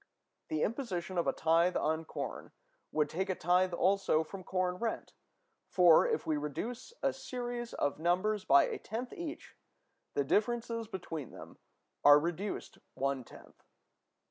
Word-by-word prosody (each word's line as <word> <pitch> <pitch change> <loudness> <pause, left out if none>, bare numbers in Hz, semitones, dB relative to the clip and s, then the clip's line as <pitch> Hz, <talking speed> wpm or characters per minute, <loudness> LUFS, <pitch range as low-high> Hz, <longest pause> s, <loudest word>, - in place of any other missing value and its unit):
The 155 -1 -1
imposition 190 -7 -2
of 170 - 0
a - - +4
tithe 165 +2 +2
on 160 +1 0
corn - - -6 0.4
would 150 -1 +2
take 190 +6 -3
a 185 - 0
tithe 180 +2 +2
also 180 -2 +2
from 185 +4 -9
corn 180 -1 -1
rent: 225 +3 -3 0.6
for, 175 -3 +6
if - - -1
we 155 -1 +1
reduce 215 - -5
a - - +2
series 240 -1 -5
of 145 +1 -1
numbers 185 +5 +1
by 140 0 +6
a - - -3
tenth 235 +4 -5
each, 335 -2 -7 0.6
the 140 - +2
differences 230 - 0
between 165 - -6
them - - -12 0.4
are 145 0 +9
reduced 175 +6 -4 0.2
one 135 -1 -1
tenth. - - -16
180 Hz, 145 wpm, -32 LUFS, 160-220 Hz, 0.6 s, are